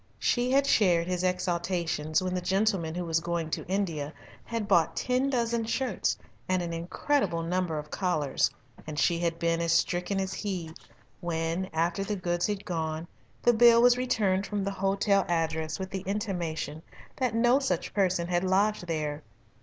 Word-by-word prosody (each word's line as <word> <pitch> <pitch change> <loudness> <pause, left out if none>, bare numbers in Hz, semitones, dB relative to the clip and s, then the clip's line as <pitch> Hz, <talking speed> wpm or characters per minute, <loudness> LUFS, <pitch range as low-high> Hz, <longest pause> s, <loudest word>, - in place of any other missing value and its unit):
She 245 0 +1
had 275 +1 +4
shared 180 -10 +3
his 180 0 -2
exultations 175 -3 0
when 185 0 -2
the 180 - -1
gentleman 190 -3 +1
who 180 0 -3
was 165 -1 +1
going 170 -1 -3
to - - -3
India 170 -6 -1 0.3
had 230 -3 -3
bought 165 -4 +3
ten 255 +2 +1
dozen 235 -3 0
shirts 230 -1 -1 0.3
and 185 -1 +1
an 170 -1 -4
incredible 170 +1 0
number 175 -1 -1
of 150 0 -6
collars, 155 -7 +1 0.4
and 155 -1 -5
she 170 +3 +2
had 170 -1 -1
been 170 0 0
as 170 0 +1
stricken 180 +3 +1
as 190 0 -2
he 185 -6 -4 0.5
when, 170 +2 -2
after 170 +4 0
the 205 +1 -2
goods 175 -2 -1
had 205 -1 -3
gone, 160 -1 -3 0.4
the 240 - +5
bill 235 0 +7
was 245 0 +7
returned 205 -6 +1
from 205 -1 -2
the 200 - -1
hotel 195 +1 +2
address 160 -2 -1
with 190 0 -5
the 190 - -3
intimation 175 -7 -3 0.4
that 250 -4 0
no 240 +3 +4
such 185 -12 -2
person 185 -4 +1
had 175 0 +1
lodged 190 0 +1
there. 155 -2 -2
180 Hz, 170 wpm, -28 LUFS, 165-205 Hz, 0.5 s, bill